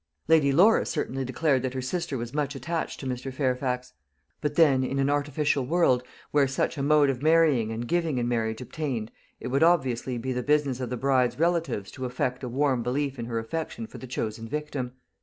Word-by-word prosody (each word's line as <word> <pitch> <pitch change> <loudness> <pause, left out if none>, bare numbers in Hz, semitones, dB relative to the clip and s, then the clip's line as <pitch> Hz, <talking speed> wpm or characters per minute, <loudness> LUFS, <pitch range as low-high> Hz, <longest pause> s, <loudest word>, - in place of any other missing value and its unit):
Lady 155 -4 +5
Laura 190 +10 +5
certainly 135 +1 -2
declared 130 +1 +1
that 130 0 -3
her - - -1
sister 165 +1 -2
was 120 +1 -5
much 145 -1 -1
attached 160 +6 -3
to - - -7
Mr. 130 +1 -3
Fairfax; 125 -1 -1 0.5
but 150 -1 -2
then, 145 -5 +5
in 135 +1 -2
an 135 +1 +2
artificial 145 -1 +1
world, 130 -3 +3 0.3
where 145 -2 +4
such 135 - -1
a 140 - -3
mode 145 0 +4
of 125 -1 -6
marrying 155 -8 +4
and 115 +2 -4
giving 165 -4 0
in 120 -1 0
marriage 115 -1 -1
obtained, 125 -5 -4 0.3
it - - -5
would 135 +3 +1
obviously 130 -7 +2
be 130 +2 -3
the 125 - -1
business 145 -2 +1
of 125 -2 -3
the 125 - -3
bride's 130 -1 +2
relatives 165 - 0
to 130 -2 -6
affect 125 +1 -2
a 125 - -3
warm 130 0 +1
belief 135 +2 -2
in 115 - -3
her 115 -1 -3
affection 160 - -4
for - - -11
the 130 - -8
chosen 115 -2 -4
victim. 145 -2 -4
135 Hz, 205 wpm, -27 LUFS, 125-150 Hz, 0.5 s, Lady